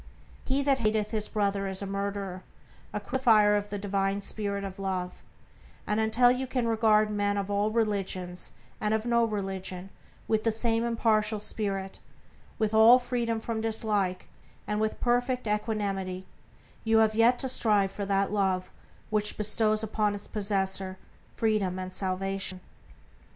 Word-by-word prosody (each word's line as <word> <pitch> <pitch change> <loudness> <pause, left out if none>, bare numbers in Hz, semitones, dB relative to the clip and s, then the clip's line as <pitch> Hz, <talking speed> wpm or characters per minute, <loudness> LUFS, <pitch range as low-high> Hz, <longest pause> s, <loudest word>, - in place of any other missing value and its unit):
"He 270 +1 +1
that 275 -1 +2
hateth 215 -2 0
his 215 -2 -2
brother 200 -2 0
is 190 +1 -1
a - - -3
murderer," 195 -1 -4 0.5
a 210 - -3
crucifier 215 -3 +3
of 205 0 -2
the 205 - -3
divine 195 0 -1
Spirit 200 -1 -1
of 195 0 -7
Love; 185 -2 -3 0.6
and 210 +1 0
until 225 +3 +4
you 255 +1 -2
can 250 -2 -1
regard 215 -1 +3
men 205 -1 0
of 200 0 -2
all 205 +1 +1
religions 195 -5 -1 0.3
and 215 0 +1
of 220 +1 -2
no 235 -1 +3
religion 195 -3 -4 0.4
with 220 -1 +1
the 225 - +2
same 225 +1 +1
impartial 220 -2 +1
spirit, 195 -2 -2 0.6
with 220 0 0
all 220 +3 +8
freedom 240 -2 -2
from 225 0 -3
dislike, 210 -4 -1 0.4
and 210 0 -1
with 220 0 -1
perfect 245 +1 0
equanimity, 200 -3 -2 0.6
you 225 0 +3
have 220 -1 +4
yet 230 +3 +4
to 265 - 0
strive 210 -6 +2
for 205 - -5
that 195 0 +1
Love 190 -3 0 0.4
which 210 -1 +1
bestows 215 +1 +2
upon 210 -1 0
its 205 - -8
possessor 190 -2 -1 0.4
freedom 210 -5 0
and 185 0 -5
salvation. 190 0 -1
210 Hz, 150 wpm, -28 LUFS, 195-225 Hz, 0.6 s, all